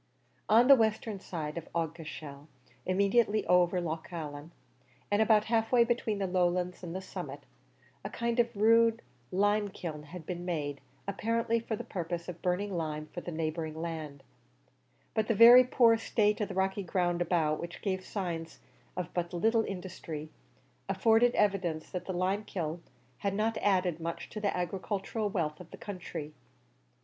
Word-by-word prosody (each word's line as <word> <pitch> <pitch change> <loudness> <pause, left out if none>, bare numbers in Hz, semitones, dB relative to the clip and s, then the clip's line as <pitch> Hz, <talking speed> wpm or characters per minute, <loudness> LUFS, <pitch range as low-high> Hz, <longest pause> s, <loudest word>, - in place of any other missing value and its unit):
On 230 +3 +6
the 275 - +10
western 220 -3 +1
side 160 -4 -4
of 165 - -14
Aughacashel, 155 -3 -5 0.4
immediately 205 +3 +2
over 180 0 +4
Loch 160 -2 -4
Allen, 150 -2 -6 0.6
and 205 +1 +3
about 220 -1 +5
half 225 0 0
way 245 -2 +6
between 235 -3 0
the 195 - -1
lowlands 180 0 0
and 175 -1 -6
the 190 - -4
summit, - - -7 0.6
a - - -4
kind 235 +1 -2
of 235 -1 +2
rude 230 +2 +4 0.3
limekiln 195 -6 0
had 165 +1 -9
been 175 0 -5
made, 150 -5 -3 0.3
apparently 230 +3 0
for 225 -1 -3
the - - -6
purpose 170 -1 -4
of 175 -2 -7
burning 185 +2 -1
lime 155 -2 -3
for 175 - -5
the 175 - -6
neighbouring 160 0 -3
land; 155 -4 -5 0.9
but 220 -1 0
the 230 - +2
very 240 +4 +10
poor 240 -2 +5
state 210 -1 +1
of 210 - 0
the 190 - -7
rocky 190 +1 0
ground 175 -1 0
about, 160 -3 +1
which 170 0 -7
gave 190 -3 -1
signs 170 -5 -4 0.4
of 180 -3 -4
but 175 0 -2
little 225 +5 +2
industry, 170 -5 -6 0.6
afforded 225 +5 +4
evidence 185 -6 0
that 180 -1 -4
the - - -3
limekiln 180 -3 -2 0.4
had 200 -1 -1
not 220 +2 +1
added 180 -4 +1
much 165 0 -5
to 215 - -5
the 200 -3 0
agricultural 195 +4 -2
wealth 160 -7 -2
of 180 -2 -11
the - - -11
country. 170 -6 -6
185 Hz, 160 wpm, -31 LUFS, 165-215 Hz, 0.9 s, the